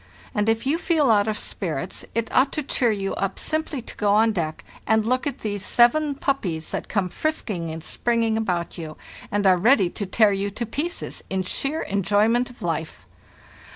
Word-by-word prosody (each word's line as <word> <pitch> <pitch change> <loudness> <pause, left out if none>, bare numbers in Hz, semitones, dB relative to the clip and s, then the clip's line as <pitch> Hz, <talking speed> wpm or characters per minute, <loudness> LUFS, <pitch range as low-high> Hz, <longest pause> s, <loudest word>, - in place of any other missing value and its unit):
And 210 +1 +1
if 225 +2 +1
you 300 +5 +1
feel 310 -8 +3
out 205 -1 +4
of 215 -1 -1
spirits, - - -3
it 230 -1 -2
ought 260 +2 +4
to 305 - -2
cheer 250 -3 +2
you 195 -3 -1
up 195 -1 -2
simply 310 -5 -1
to - - -9
go 205 -1 +2
on 220 +1 +4
deck 160 -6 -3 0.2
and 220 -1 +3
look 255 +5 +1
at 285 - -4
these 205 -2 -3
seven 280 +7 +4
puppies 190 - -2
that - - -3
come 200 -4 0
frisking 195 - -2
and 160 0 -6
springing 230 -2 0
about 180 -7 -2
you, 155 -2 -7 0.3
and 205 0 0
are 185 -1 +6
ready 195 -2 +4
to 205 - -4
tear 210 +2 +4
you 195 +1 -1
to 220 +4 -4
pieces 300 - -3
in 190 -1 -1
sheer 275 - -2
enjoy 200 +2 +2
ment 240 +2 +1
of 245 - -13
life. 160 - -3
215 Hz, 195 wpm, -24 LUFS, 190-250 Hz, 0.3 s, are